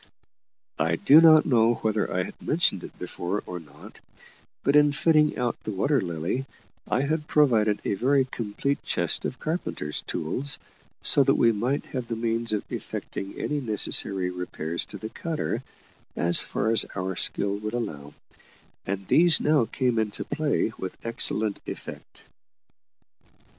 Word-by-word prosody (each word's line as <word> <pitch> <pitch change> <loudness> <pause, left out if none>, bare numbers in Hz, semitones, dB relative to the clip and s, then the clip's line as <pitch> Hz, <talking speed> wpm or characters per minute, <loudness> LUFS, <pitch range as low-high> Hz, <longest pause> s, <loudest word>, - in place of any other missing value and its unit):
I 80 +1 +1
do 145 - +6
not 160 -2 +7
know 120 -3 +3
whether 110 -1 -1
I 90 - 0
have - - -10
mentioned - - 0
it - - -11
before 90 +4 -4
or 90 0 -6
not, 75 -2 -15 0.6
but, 140 - +2
in 150 0 +6
fitting 155 0 +3
out 120 -1 -2
the - - -7
Water 135 +7 +1
Lily, 85 - -3 0.4
I 130 - +1
had 150 +2 -2
provided 110 -8 +3
a - - 0
very 135 +6 +2
complete 130 +3 -3
chest - - -1
of 130 - -4
carpenter's 155 - -3
tools, 130 - 0 0.5
so - - +5
that - - +3
we 115 - +4
might 120 +6 -2
have 125 -3 -3
the 115 - -3
means 115 0 0
of 105 -2 -1
effecting 95 0 -6
any 150 - -2
necessary 100 -5 +2
repairs 85 -2 -4
to - - -9
the 110 +3 -7
cutter, 165 +3 -3 0.5
as 85 0 +5
far 110 +2 -1
as 115 - +5
our 95 0 -3
skill 100 +3 0
would 105 +2 -5
allow; 75 -11 -5 0.7
and 95 0 -3
these 170 0 +5
now 150 -5 +2
came 125 0 -1
into 105 -2 -2
play 145 -6 -1
with 95 - -6
excellent 110 -2 +1
effect. - - -9
115 Hz, 155 wpm, -25 LUFS, 95-140 Hz, 0.7 s, not